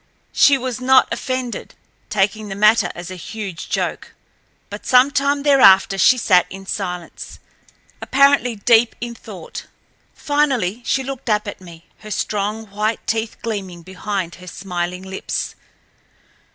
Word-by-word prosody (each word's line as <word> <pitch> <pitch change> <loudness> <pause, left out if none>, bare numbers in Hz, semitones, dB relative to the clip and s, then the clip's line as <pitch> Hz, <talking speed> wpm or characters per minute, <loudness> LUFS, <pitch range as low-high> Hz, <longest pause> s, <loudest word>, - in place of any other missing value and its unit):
She 280 -1 +5
was 255 -2 -4
not 260 +1 +4
offended, 255 -2 -4 0.3
taking 210 +1 0
the 195 - -5
matter 215 +3 +4
as 175 +1 -8
a - - -6
huge 190 -1 -7
joke. - - -3 0.5
But - - -9
some 255 +2 +5
time 280 0 0
thereafter 195 -9 +5
she 255 - +5
sat 185 -7 +3
in 195 0 -10
silence, 180 -4 -5 0.6
apparently 275 -3 +3
deep 225 +2 +3
in 240 0 -5
thought. - - -10 0.5
Finally 265 -8 0
she 265 - +1
looked 270 -2 -6
up 210 -1 +1
at 205 - -7
me, 170 -2 -13
her 215 - -11
strong 210 +1 -3
white 215 +2 -2
teeth 225 0 -2
gleaming 190 -6 -5
behind 190 -1 -4
her 180 - -12
smiling 180 -1 -4
lips. 190 0 -4
215 Hz, 140 wpm, -20 LUFS, 190-255 Hz, 0.6 s, She